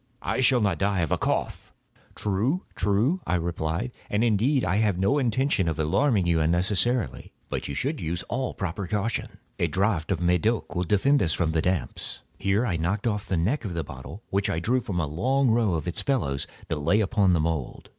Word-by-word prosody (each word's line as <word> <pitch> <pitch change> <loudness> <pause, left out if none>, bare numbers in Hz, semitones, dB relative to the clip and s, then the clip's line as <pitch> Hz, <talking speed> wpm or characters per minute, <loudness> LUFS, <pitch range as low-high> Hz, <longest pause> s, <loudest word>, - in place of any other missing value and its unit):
I - - -1
shall 125 -1 +4
not 100 -2 +1
die 100 -2 +1
of 80 - -1
a - - +3
cough." - - -2 0.4
"True—true," 110 - 0
I 90 - +2
replied; 85 +5 -2 0.2
"and, 105 +2 +1
indeed, 120 +5 +2
I 95 - +1
had 105 -4 +2
no 100 +10 +2
intention 130 -6 +1
of 80 -2 -1
alarming 100 - +2
you 85 -1 +2
unnecessarily—but 90 - -1
you 70 - -4
should 140 - -2
use 85 +2 -2
all 130 +1 -3
proper 95 +1 -3
caution. 105 +5 -2 0.2
A - - +2
draught 95 -4 0
of - - +2
this 90 - -3
Medoc 90 +4 +1
will 90 0 -1
defend 135 - +3
us 80 -5 +1
from 85 -3 0
the 80 0 +1
damps." 90 0 -2 0.2
Here 100 +5 +1
I 95 -8 0
knocked 90 +7 -1
off 105 -3 -1
the 95 - 0
neck 110 - 0
of 95 -6 -4
a 85 - 0
bottle 65 - -9
which 100 0 +1
I 80 - 0
drew 125 +9 +1
from 95 -6 -3
a 80 - +1
long 125 - +1
row 110 -6 +2
of 80 +2 -3
its 85 - -2
fellows 70 - -1 0.2
that 80 - -1
lay 85 +9 +2
upon 100 -3 +3
the 85 - +3
mould. 80 -4 -3
100 Hz, 205 wpm, -26 LUFS, 85-115 Hz, 0.4 s, shall